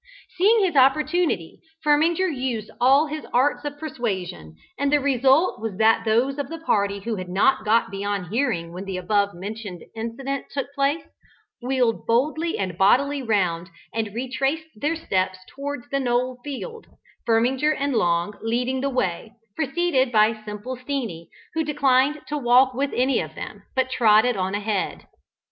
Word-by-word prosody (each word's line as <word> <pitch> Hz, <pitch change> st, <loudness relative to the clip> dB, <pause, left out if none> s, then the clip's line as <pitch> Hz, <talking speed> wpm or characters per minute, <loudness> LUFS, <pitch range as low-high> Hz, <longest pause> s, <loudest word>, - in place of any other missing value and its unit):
Seeing 415 Hz, +4 st, +4 dB
his 355 Hz, -5 st, 0 dB
opportunity, 275 Hz, -, +2 dB, 0.3 s
Firminger 320 Hz, +5 st, +3 dB
used 250 Hz, -, -3 dB
all 270 Hz, +5 st, +5 dB
his 310 Hz, 0 st, -5 dB
arts 265 Hz, +5 st, +2 dB
of 290 Hz, 0 st, -4 dB
persuasion, 195 Hz, -, -4 dB, 0.2 s
and 280 Hz, 0 st, +1 dB
the 295 Hz, -, +4 dB
result 270 Hz, +1 st, +3 dB
was 220 Hz, -4 st, -4 dB
that 225 Hz, +1 st, +3 dB
those 245 Hz, +6 st, +1 dB
of 280 Hz, -, -3 dB
the 330 Hz, -, -5 dB
party 200 Hz, -10 st, 0 dB
who 225 Hz, +1 st, -3 dB
had 185 Hz, -1 st, -6 dB
not 215 Hz, +5 st, +2 dB
got 220 Hz, -1 st, +2 dB
beyond 200 Hz, -2 st, -3 dB
hearing 225 Hz, -10 st, -1 dB
when 185 Hz, +2 st, -6 dB
the 190 Hz, -1 st, -4 dB
above 200 Hz, +1 st, +1 dB
mentioned 200 Hz, -1 st, -7 dB
incident 250 Hz, +5 st, -4 dB
took 275 Hz, -1 st, -4 dB
place, 280 Hz, +3 st, 0 dB, 0.6 s
wheeled 250 Hz, -2 st, 0 dB
boldly 310 Hz, +8 st, +1 dB
and 185 Hz, -3 st, -4 dB
bodily 280 Hz, +8 st, +3 dB
round, 180 Hz, -7 st, 0 dB, 0.2 s
and 220 Hz, -2 st, -3 dB
retraced 270 Hz, +5 st, -1 dB
their 295 Hz, +9 st, -1 dB
steps 185 Hz, -, -1 dB, 0.2 s
towards 280 Hz, -2 st, -5 dB
the 275 Hz, -, +1 dB
knoll 250 Hz, 0 st, 0 dB
field, 445 Hz, -, -7 dB, 0.4 s
Firminger 250 Hz, +6 st, +2 dB
and 280 Hz, 0 st, -1 dB
Long 175 Hz, -1 st, +1 dB
leading 245 Hz, +3 st, -1 dB
the 275 Hz, -, 0 dB
way, 220 Hz, -3 st, -2 dB, 0.2 s
preceded 280 Hz, -3 st, +1 dB
by 215 Hz, -1 st, +3 dB
"Simple 215 Hz, +5 st, -6 dB
Steenie," 245 Hz, -, -4 dB, 0.2 s
who 320 Hz, +1 st, 0 dB
declined 285 Hz, -1 st, +2 dB
to 295 Hz, 0 st, -3 dB
walk 255 Hz, +1 st, +4 dB
with 275 Hz, +3 st, -1 dB
any 255 Hz, +2 st, +2 dB
of -, -, -5 dB
them, -, -, -8 dB
but 260 Hz, 0 st, +1 dB
trotted 230 Hz, 0 st, +4 dB
on 190 Hz, 0 st, -1 dB
ahead. 205 Hz, -1 st, -2 dB
250 Hz, 160 wpm, -23 LUFS, 210-280 Hz, 0.6 s, all